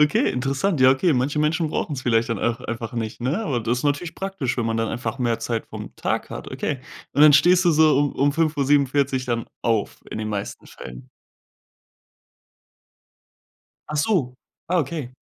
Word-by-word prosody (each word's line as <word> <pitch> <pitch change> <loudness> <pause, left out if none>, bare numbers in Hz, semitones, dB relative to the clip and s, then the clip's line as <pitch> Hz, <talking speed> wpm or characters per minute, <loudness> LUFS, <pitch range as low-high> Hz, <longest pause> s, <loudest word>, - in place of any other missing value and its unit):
Okay, 150 -1 +3
interessant. 135 +6 -1
Ja, 130 0 +7
okay, 150 +5 +2
manche 135 +4 0
Menschen 155 +2 +1
brauchen 150 - -2
es 135 - -3
vielleicht 115 0 +1
dann 110 - -1
auch 115 +1 -1
einfach 120 -1 -5
nicht, 115 0 -4
ne? 140 - -1
Aber 125 - -1
das 120 +3 -1
ist - - -6
natürlich 145 +4 -1
praktisch, 190 -11 -3
wenn 120 - -1
man 115 0 -1
dann 115 - 0
einfach 115 0 -4
mehr 120 -2 0
Zeit 115 0 -3
vom - - -9
Tag - - -2
hat, - - -7
okay. - - -3 0.3
Und 145 - 0
dann 150 -1 +8
stehst 175 +5 +5
du - - +6
so 155 -2 +4
um 145 -1 +1
um 140 +2 +1
5:47 140 -3 +1
dann 115 -1 -1 0.2
auf 115 -3 -1
in - - -5
den 110 0 -3
meisten 100 -1 -5
Fällen? 60 0 -11 2.8
Ach 150 - -2
so, 150 - +1 0.3
ah, 180 +1 +1
okay. 150 -4 -2
135 Hz, 185 wpm, -23 LUFS, 120-150 Hz, 2.8 s, dann